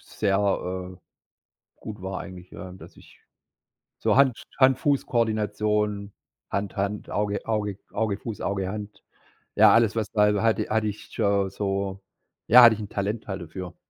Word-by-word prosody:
sehr, 100 -2 -1 0.6
äh, - - -25 0.8
gut 105 -2 -9
war 95 0 -4
eigentlich, 90 -2 -11
ja, 95 - -9
dass 95 - -14
ich - - -18 0.8
so - - +2
Hand 135 -4 +3 0.2
Hand-Fuß-Koordination, 110 -6 +1 0.4
Hand-Hand, 100 +1 -3
Auge 105 0 -2
Auge 105 -3 -2 0.2
Auge-Fuß, 105 0 -3
Auge-Hand 100 +2 -4 0.5
ja, - - +7
alles, 115 -1 +3
was 110 -2 -1
da 105 - +1
hal 105 -1 +3 0.3
hatte 110 0 +1
ich 105 0 -6
schon 100 -1 +1
so 100 -1 -3 0.5
ja, 125 +2 +9
hatte 115 -2 +8
ich 110 - -8
'n 105 - -7
Talent 105 +3 -3
halt 95 -2 -4
dafür. 90 +2 -8
105 Hz, 140 wpm, -25 LUFS, 100-110 Hz, 0.8 s, ja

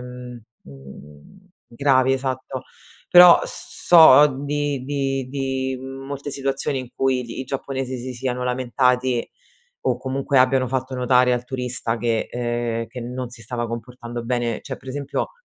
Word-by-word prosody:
mhmm, 125 -1 -9 0.2
mhmm, 75 - -15 0.2
gravi, 130 +1 +2
esatto. 130 0 -3 0.5
Però 175 -1 +9
s - - -9
so 150 -4 +8 0.2
di 145 -2 -2
di 135 -2 -2
di 130 -1 -2
molte 135 +2 -7
situazioni 135 0 -2
in 125 -2 -7
cui 130 -1 0
gli 120 +2 -7
i 130 - -4
giapponesi 130 -1 -4
si 130 +2 -6
siano 125 0 -3
lamentati 125 0 0 0.6
o - - +1
comunque 135 +1 0
abbiano 130 0 +3
fatto 130 +1 -3
notare 125 0 +3
al 120 0 -4
turista 125 -2 -3
che 115 -1 -1
ehm, 120 -1 -2
che 125 +3 -9
non 125 +1 -5
si 115 -1 -13
stava 120 +1 -3
comportando 120 0 -7
bene. 120 -2 -1
C'è 135 -3 -7
per - - -20
esempio 140 +1 -3
130 Hz, 150 wpm, -22 LUFS, 120-135 Hz, 0.6 s, Però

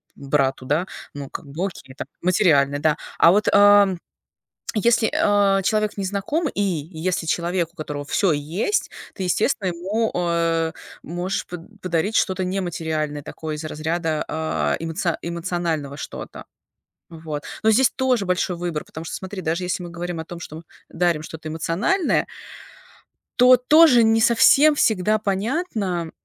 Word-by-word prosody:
брату, 135 -2 -1
да? 150 +7 0 0.3
Ну, 140 -1 -7
как - - -8
бы 150 +7 -4
окей, 135 -9 -8
там - - -6
материальное, 155 -7 +3
да. 155 0 +2 0.2
А 165 - +7
вот, 205 +3 +2
ам, 205 -2 +6 0.8
если, 230 +1 +2
а, 200 -1 +3
человек 215 +1 0
незнакомый 205 - -2
и 205 - 0
если 170 0 -2
человек, 170 +1 -1
у - - -37
которого 150 -3 -5
всё 185 +5 +1
есть, 160 - -1 0.2
ты, 190 - -6
естественно, 195 +3 0
ему, 195 +6 -1
а, 165 -2 0 0.3
можешь 175 +4 -3
под 180 +4 -11
подарить 185 +4 -1
что-то 190 0 +1
нематериальное. 160 -5 -3
Такое 155 +1 -6
из 150 - -7
разряда, 155 +1 -2
а, 80 - -1
эмоци 165 +1 -2
эмоционального 170 -4 -3
что-то. - - -8 0.6
Вот. 160 -3 -7 0.2
Но 220 - +4
здесь 255 +4 +4
тоже 255 -5 +1
большой 180 0 0
выбор, 170 -3 -4
потому 160 - -9
что - - -6
смотри, 190 +1 -6
даже 170 +1 -2
если 180 +1 -2
мы 175 -1 -7
говорим 175 0 -5
о 160 - -5
том, 170 +1 -9
что, 155 - -8
м, 160 - -9 0.3
дарим 170 -3 0
что-то 160 0 -8
эмоциональное 175 - 0 1.1
то 250 +1 +7
тоже 255 -1 +6
не 225 0 +3
совсем 275 +6 +5
всегда 215 -4 +2
понятно, 200 - -2
175 Hz, 150 wpm, -22 LUFS, 160-205 Hz, 1.1 s, А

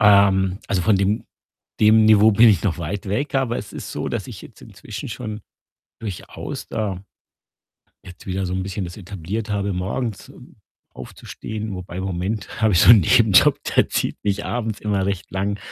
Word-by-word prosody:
ähm, 100 -3 +4
also, 90 -2 0
von 105 -1 +3
dem 100 +3 0 0.6
dem 110 +1 +6
Niveau 110 0 +6
bin 115 +3 +7
ich 105 - +3
noch 95 -6 0
weit 95 +6 -5
weg, 125 +10 -2
aber 130 -3 +1
es 100 - -8
ist - - -7
so, - - -3
dass - - -4
ich - - -10
jetzt - - -14
inzwischen - - -9
schon 110 -2 -6 0.6
durchaus 105 -6 -7
da 100 -4 -3 1.0
jetzt 90 -1 -13
wieder 95 0 -2
so 90 - -3
'n 95 - -2
bisschen 95 0 -4
das 85 0 -8
etabliert 100 +2 -5
habe, 100 -1 -1
morgens, 100 +4 -3
ähm, - - -16 0.4
aufzustehen 110 -2 -7
wobei 90 -1 -7
im 95 - -3
Moment 95 +4 -4
habe 110 -2 +4
ich 85 - +5
so - - +8
'n 115 -3 +9
Nebenjob, 110 +1 +5 0.2
der - - +4
zieht - - -1
mich 100 0 -1
abends 115 -3 -3
immer 100 -2 -1
recht 100 -1 -3
lang 100 +2 -2
100 Hz, 185 wpm, -21 LUFS, 95-110 Hz, 1.0 s, n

